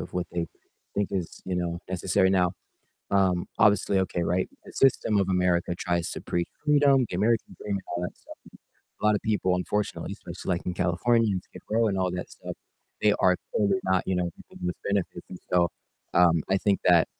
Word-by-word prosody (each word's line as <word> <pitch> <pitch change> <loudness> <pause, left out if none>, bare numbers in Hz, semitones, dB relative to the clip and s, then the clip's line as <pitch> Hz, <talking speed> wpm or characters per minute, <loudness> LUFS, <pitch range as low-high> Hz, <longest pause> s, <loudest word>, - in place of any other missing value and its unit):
of - - -7
what 90 -1 -2
they 85 -1 -1 0.5
think 100 -1 0
is, 90 -4 -4
you 95 -1 -2
know, 85 -1 -2
necessary. 95 +1 +2
Now, 90 -2 +3 0.6
um, 95 -3 +2
obviously, 100 -3 +4
okay, 90 -2 -1
right? 90 +2 +1 0.2
The - - -12
system 120 -5 +3
of 95 -1 +2
America 90 -1 +2
tries 85 -2 -1
to - - -5
preach 85 0 -1 0.2
freedom, 140 -3 +5
the - - -4
American 110 +4 +1
dream 105 - -3
and 95 - -3
all 90 - -2
that - - -5
stuff. - - -13 0.7
A - - -3
lotta 105 -1 +4
people, 105 -4 +1
unfortunately, 105 +3 -2
especially, - - -9
like, - - -6
in 90 - 0
California, 105 +6 +2
and 95 -1 -2
Skid - - -14
Row 115 0 +3
and 95 - -1
all 95 -1 +1
that 90 0 -5
stuff, - - -8 0.5
they 105 - +5
are 90 0 +5 0.2
totally 100 -2 +2
not, 95 0 +2
you 95 - 0
know, 90 - +1
reaping 85 +1 -8
those 90 - -1
benefits. 100 -2 -2
And 90 - -8
so, 85 -1 +4 0.5
um, 85 -2 +5
I 95 - +4
think 100 0 +1
that 85 -2 +6
95 Hz, 200 wpm, -27 LUFS, 90-105 Hz, 0.7 s, that